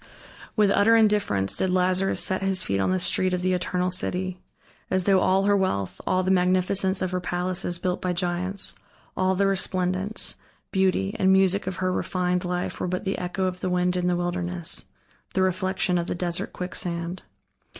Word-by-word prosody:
With 210 Hz, -2 st, +4 dB
utter 215 Hz, +3 st, +5 dB
indifference 205 Hz, -, +2 dB
did 190 Hz, -, +1 dB
Lazarus 185 Hz, +1 st, +1 dB
set 190 Hz, -1 st, 0 dB
his 190 Hz, -1 st, +1 dB
feet 100 Hz, -, -1 dB
on 95 Hz, -, +1 dB
the 185 Hz, -, +2 dB
street 185 Hz, +1 st, +1 dB
of 180 Hz, -, -4 dB
the 185 Hz, 0 st, +2 dB
eternal 180 Hz, 0 st, 0 dB
city. 185 Hz, 0 st, -1 dB, 0.5 s
As 185 Hz, -1 st, +1 dB
though 195 Hz, 0 st, +4 dB
all 190 Hz, +1 st, +3 dB
her 205 Hz, 0 st, +4 dB
wealth, 100 Hz, -, -1 dB
all 185 Hz, 0 st, +2 dB
the 185 Hz, -, +1 dB
magnificence 185 Hz, +1 st, +2 dB
of 185 Hz, -, -1 dB
her 185 Hz, -, 0 dB
palaces 180 Hz, 0 st, -1 dB
built 180 Hz, 0 st, -2 dB
by 180 Hz, -, 0 dB
giants, 180 Hz, +2 st, -2 dB, 0.4 s
all 185 Hz, 0 st, +1 dB
the 200 Hz, +2 st, +2 dB
resplendence, 185 Hz, +1 st, -1 dB, 0.3 s
beauty, 190 Hz, +1 st, +1 dB
and 190 Hz, 0 st, +4 dB
music 190 Hz, 0 st, +3 dB
of 185 Hz, -, -2 dB
her 185 Hz, 0 st, 0 dB
refined 180 Hz, -1 st, -1 dB
life 180 Hz, 0 st, -3 dB
were -, -, -1 dB
but 180 Hz, +2 st, -3 dB
the 195 Hz, -, -1 dB
echo 180 Hz, +1 st, -2 dB
of 185 Hz, -1 st, -2 dB
the 185 Hz, -, -2 dB
wind 180 Hz, 0 st, +1 dB
in 180 Hz, 0 st, 0 dB
the 180 Hz, -, +2 dB
wilderness, 175 Hz, 0 st, -1 dB, 0.5 s
the 190 Hz, -, +3 dB
reflection 185 Hz, -1 st, 0 dB
of 170 Hz, -, -3 dB
the -, -, -2 dB
desert 175 Hz, -1 st, -3 dB
quicksand. 175 Hz, -1 st, -4 dB
185 Hz, 185 wpm, -25 LUFS, 180-190 Hz, 0.5 s, utter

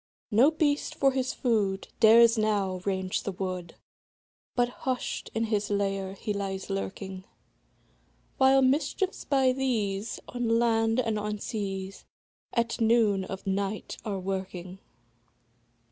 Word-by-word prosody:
No 235 Hz, +7 st, +6 dB
beast, 305 Hz, -2 st, 0 dB
for 275 Hz, -1 st, +3 dB
his 260 Hz, -1 st, -1 dB
food, 205 Hz, -6 st, 0 dB
Dares 230 Hz, +1 st, +7 dB
now 205 Hz, -4 st, 0 dB
range 190 Hz, -1 st, -1 dB
the 200 Hz, -, -3 dB
wood, 185 Hz, -2 st, -5 dB, 0.8 s
But 245 Hz, -1 st, +2 dB
hush'd 255 Hz, +1 st, -3 dB
in 225 Hz, -, +1 dB
his 210 Hz, -2 st, -1 dB
lair 195 Hz, -1 st, -1 dB
he 210 Hz, +2 st, -3 dB
lies 195 Hz, -1 st, -4 dB
lurking; 190 Hz, -1 st, -4 dB, 1.1 s
While 265 Hz, 0 st, +5 dB
mischiefs, 310 Hz, +8 st, 0 dB
by 265 Hz, -2 st, +3 dB
these, 225 Hz, -6 st, -1 dB
On 235 Hz, -2 st, 0 dB
land 225 Hz, 0 st, +2 dB
and 225 Hz, -4 st, 0 dB
on 210 Hz, 0 st, -3 dB
seas, 195 Hz, -2 st, -5 dB, 0.5 s
At 235 Hz, 0 st, -1 dB
noon 220 Hz, -4 st, +3 dB
of 190 Hz, 0 st, -7 dB
night 195 Hz, +2 st, -2 dB
are 205 Hz, -2 st, -3 dB
a -, -, -3 dB
working. 185 Hz, -1 st, -5 dB
210 Hz, 130 wpm, -28 LUFS, 195-240 Hz, 1.1 s, Dares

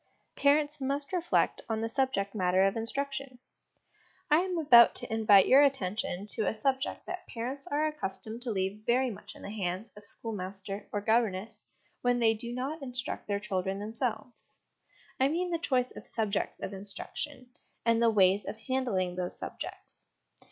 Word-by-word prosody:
Parents 290 Hz, +1 st, +2 dB
must 280 Hz, +4 st, -2 dB
reflect 350 Hz, -1 st, +1 dB
on 220 Hz, -1 st, -1 dB
the 225 Hz, -, 0 dB
Subject 230 Hz, -5 st, 0 dB
matter 185 Hz, -2 st, +3 dB
of 195 Hz, -, +1 dB
Instruction. 275 Hz, +3 st, -3 dB, 0.9 s
I 300 Hz, -, +7 dB
am 365 Hz, 0 st, -1 dB
about 245 Hz, -7 st, +7 dB
to -, -, -2 dB
invite 210 Hz, -3 st, +6 dB
your 270 Hz, +2 st, +8 dB
attention 205 Hz, -8 st, 0 dB
to 220 Hz, -, 0 dB
a -, -, 0 dB
subject 265 Hz, +5 st, -1 dB
that 360 Hz, 0 st, -6 dB
parents 255 Hz, +6 st, -4 dB
are 300 Hz, -1 st, +1 dB
accustomed 225 Hz, -6 st, -4 dB
to 245 Hz, -, -4 dB
leave 195 Hz, +1 st, -2 dB
very 250 Hz, +1 st, +3 dB
much 210 Hz, +1 st, -10 dB
in -, -, -13 dB
the 200 Hz, -, -6 dB
hands 195 Hz, +1 st, -3 dB
of 210 Hz, 0 st, -7 dB
schoolmaster 195 Hz, -2 st, -5 dB
or 205 Hz, -, -1 dB
governess 220 Hz, -1 st, 0 dB, 0.4 s
when 245 Hz, 0 st, +2 dB
they 225 Hz, -2 st, +4 dB
do 235 Hz, +2 st, -5 dB
not 270 Hz, +6 st, -3 dB
instruct 255 Hz, +1 st, -5 dB
their 200 Hz, -1 st, 0 dB
children 190 Hz, -2 st, -2 dB
themselves 220 Hz, +2 st, -5 dB, 0.6 s
I 265 Hz, -, +5 dB
.nean 350 Hz, +4 st, -1 dB
the 335 Hz, -, 0 dB
choice 255 Hz, -6 st, +1 dB
of -, -, -9 dB
subjects 215 Hz, -3 st, -1 dB
of 200 Hz, -, -5 dB
instruction, 250 Hz, +7 st, -6 dB, 0.3 s
and 230 Hz, 0 st, +3 dB
the 230 Hz, -, +5 dB
ways 195 Hz, -2 st, +4 dB
of 205 Hz, +4 st, -6 dB
handling 220 Hz, -6 st, -1 dB
those 180 Hz, -1 st, -3 dB
subjects. -, -, -8 dB
230 Hz, 165 wpm, -30 LUFS, 200-270 Hz, 0.9 s, your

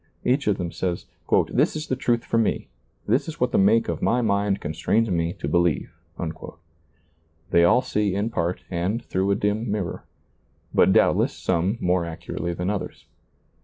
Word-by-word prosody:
Each 130 Hz, +1 st, +1 dB
of 105 Hz, -2 st, +2 dB
them 85 Hz, -1 st, -3 dB
says, 90 Hz, -1 st, -3 dB, 0.2 s
" -, -, +2 dB
This -, -, +2 dB
is 155 Hz, 0 st, -3 dB
the 130 Hz, -, -1 dB
truth 120 Hz, -2 st, 0 dB
for 115 Hz, -, +1 dB
me; 115 Hz, -, 0 dB, 0.4 s
this 125 Hz, +7 st, +2 dB
is 160 Hz, -, -7 dB
what 125 Hz, 0 st, +1 dB
the -, -, +3 dB
make 110 Hz, +4 st, +4 dB
of -, -, -3 dB
my 120 Hz, +1 st, +2 dB
mind 100 Hz, -2 st, +1 dB
constrains 105 Hz, +8 st, 0 dB
me 85 Hz, -1 st, 0 dB
to -, -, -6 dB
believe." 85 Hz, +1 st, +1 dB, 1.6 s
They 85 Hz, -, +5 dB
all 125 Hz, +9 st, +5 dB
see 105 Hz, -5 st, 0 dB
in 105 Hz, +3 st, -1 dB
part 85 Hz, -4 st, -2 dB
and 95 Hz, +7 st, -1 dB
through 95 Hz, +1 st, 0 dB
a 100 Hz, -, +3 dB
dim 105 Hz, +3 st, -1 dB
mirror, 100 Hz, -5 st, -3 dB, 0.7 s
but -, -, +5 dB
doubtless -, -, +3 dB
some 95 Hz, +5 st, 0 dB
more 90 Hz, 0 st, +1 dB
accurately 85 Hz, +1 st, -4 dB
than 90 Hz, +3 st, -1 dB
others. 100 Hz, -3 st, -5 dB
100 Hz, 175 wpm, -24 LUFS, 85-115 Hz, 1.6 s, They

